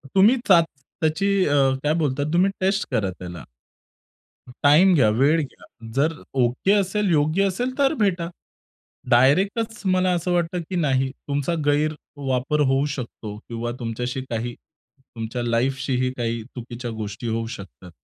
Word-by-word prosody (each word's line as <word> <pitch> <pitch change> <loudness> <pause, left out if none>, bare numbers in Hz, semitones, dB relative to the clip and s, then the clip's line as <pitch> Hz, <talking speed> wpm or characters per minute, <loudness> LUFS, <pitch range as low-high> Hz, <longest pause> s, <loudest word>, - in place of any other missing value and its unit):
तुम्ही 210 +7 +6
चाच 170 -4 +6 0.4
त्याची 160 +6 +1 0.2
अ, 145 - +1 0.3
काय 150 +1 +2
बोलतात 145 -4 0
तुम्ही 185 +3 +3
टेस्ट 195 +2 +1
करा 110 -6 +1
त्याला. 90 -2 -8 1.2
टाईम 160 +7 +6
घ्या, 110 -7 +4
वेळ 140 +9 +3
घ्या, 140 - -9 0.3
जर 155 +4 +2 0.3
ओके 125 +11 +1
असेल, 205 0 +1
योग्य 155 +5 +2
असेल, 245 +7 -2
तर 280 +1 +3
भेटा. 180 -5 +1 0.8
डायरेक्टच 195 - +3
मला 185 0 +2
असं 175 +1 -1
वाटतं, 175 0 0
की 190 - -3
नाही. 135 -5 +1 0.2
तुमचा 145 +3 -1
गैरवापर 145 -2 0
होऊ 135 +2 +2
शकतो 110 -4 -7
किंवा 120 +1 -3
तुमच्याशी 125 +2 -3
काही 120 +1 -3 0.4
तुमच्या 120 -1 -6
लाईफशीही 130 +2 0
काही 115 -2 -2
चुकीच्या 120 0 -6
गोष्टी 110 0 -5
होऊ 115 0 -1
शकतात. 95 -2 -12
145 Hz, 135 wpm, -23 LUFS, 120-180 Hz, 1.2 s, तुम्ही